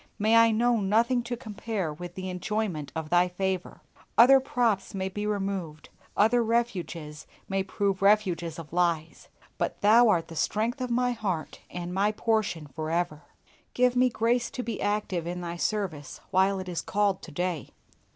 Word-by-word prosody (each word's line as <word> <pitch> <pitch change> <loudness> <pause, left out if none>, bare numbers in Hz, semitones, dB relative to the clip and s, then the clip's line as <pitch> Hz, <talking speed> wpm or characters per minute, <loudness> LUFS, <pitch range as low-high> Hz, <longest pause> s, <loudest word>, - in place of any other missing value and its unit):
May 215 +2 +3
I 230 0 +7
know 235 +2 +2
nothing 225 +5 +2
to 240 0 -3
compare 210 -7 -4
with 175 +3 -9
the 185 0 -5
enjoyment 180 -4 -3
of 160 -1 -4
Thy 175 +1 +4
favor. 185 0 -3 0.4
Other 265 +4 +8
props 235 -7 0
may 190 0 -2
be 205 +2 -4
removed, 195 -6 -3 0.3
other 230 +3 +4
refuges 180 -10 -2 0.2
may 195 0 0
prove 195 0 -1
refuges 185 -6 +2
of 165 -1 -9
lies, 170 -3 0 0.3
but - - -2
Thou 225 +3 +6
art 170 -5 +2
the 165 - -10
strength 225 - -1
of 250 - -2
my 245 +1 +1
heart 200 -9 -3
and 180 0 -5
my 200 +3 +2
portion 215 -8 0
for 155 +3 -6
ever. 165 -2 -1 0.5
Give 250 0 +3
me 250 +1 +4
grace 235 +1 +1
to 250 - -5
be 230 -3 -4
active 205 -5 -1
in 180 +1 -4
Thy 170 0 -5
service 175 -8 -3
while 190 +1 +3
it 185 -1 -6
is 175 -2 -3
called 200 -1 0
to - - -10
day. 175 -1 -2
195 Hz, 170 wpm, -27 LUFS, 175-225 Hz, 0.5 s, Other